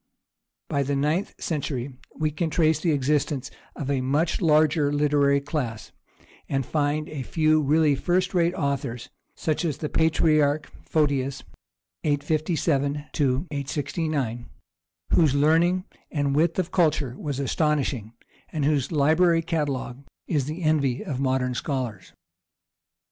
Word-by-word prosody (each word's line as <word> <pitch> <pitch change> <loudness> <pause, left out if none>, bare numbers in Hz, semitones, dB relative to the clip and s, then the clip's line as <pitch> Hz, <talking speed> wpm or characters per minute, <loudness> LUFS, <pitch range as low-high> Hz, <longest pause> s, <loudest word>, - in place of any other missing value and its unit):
By 140 - 0
the 140 +1 -1
ninth 150 +7 0
century 140 -4 -3 0.2
we 155 -1 0
can 160 +2 -2
trace 160 -1 +2
the 165 +1 +1
existence 145 -1 0 0.2
of 140 -1 -3
a 135 -2 +1
much 150 +8 0
larger 155 -2 +3
literary 145 -1 +3
class, 140 -7 -4 0.6
and 135 -2 0
find 150 +1 0
a 150 -3 -5
few 155 +3 +2
really 150 +1 +3
first 180 +8 0
rate 175 -1 +2
authors, 140 -5 -3 0.2
such 155 +2 -1
as 155 -5 -1
the 150 - -4
patriarch 155 -2 +2
Photius 140 -3 0 0.6
(857 150 -1 0 0.6
69), 140 -5 -2 0.6
whose 155 -5 +4
learning 165 +5 +3 0.3
and 140 -2 0
width 165 +2 +2
of 185 -2 -1
culture 150 -7 +1
was 140 -1 -4
astonishing, 140 -6 0 0.4
and 150 -3 -1
whose 145 -1 +1
library 165 +3 +3
catalogue 140 -5 -2 0.2
is 145 -6 0
the 155 +5 -5
envy 145 - +1
of 140 -9 -3
modern 130 -1 0
scholars. 125 -7 -4
150 Hz, 125 wpm, -25 LUFS, 140-160 Hz, 0.6 s, whose